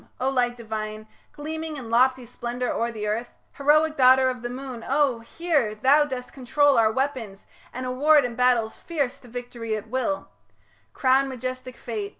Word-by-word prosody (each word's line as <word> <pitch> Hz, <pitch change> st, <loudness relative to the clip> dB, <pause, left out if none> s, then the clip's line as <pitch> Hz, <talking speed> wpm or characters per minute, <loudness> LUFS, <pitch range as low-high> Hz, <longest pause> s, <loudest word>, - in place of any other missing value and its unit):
O 260 Hz, +1 st, +1 dB
light 245 Hz, -2 st, +1 dB
divine, 215 Hz, -2 st, -6 dB, 0.2 s
Gleaming 315 Hz, +1 st, -5 dB
in 235 Hz, -4 st, -8 dB
lofty 255 Hz, +1 st, +3 dB
splendour 245 Hz, +1 st, -4 dB
o'er 235 Hz, -, -1 dB
the 215 Hz, -2 st, -5 dB
earth 225 Hz, +3 st, -2 dB, 0.2 s
Heroic 305 Hz, +2 st, +3 dB
daughter 260 Hz, -1 st, +5 dB
of 250 Hz, -2 st, -8 dB
the 240 Hz, -, -4 dB
moon, 250 Hz, -2 st, -7 dB
oh! 275 Hz, -3 st, +2 dB
hear; 275 Hz, -3 st, -1 dB
Thou 275 Hz, +7 st, +4 dB
dost 255 Hz, -3 st, -6 dB
control 280 Hz, +2 st, +2 dB
our 220 Hz, -1 st, +4 dB
weapons 240 Hz, -6 st, -3 dB, 0.3 s
and 255 Hz, +1 st, -5 dB
award 285 Hz, +3 st, +4 dB
In 245 Hz, -, -3 dB
battles 240 Hz, -2 st, +2 dB
fierce 290 Hz, -7 st, -3 dB
the 250 Hz, -, -16 dB
victory 240 Hz, -2 st, -5 dB
at 215 Hz, +1 st, -7 dB
will 260 Hz, +4 st, -2 dB, 0.6 s
crown'd 270 Hz, +1 st, +2 dB
majestic 255 Hz, 0 st, -6 dB
Fate. 215 Hz, -4 st, -5 dB
255 Hz, 165 wpm, -25 LUFS, 230-275 Hz, 0.6 s, daughter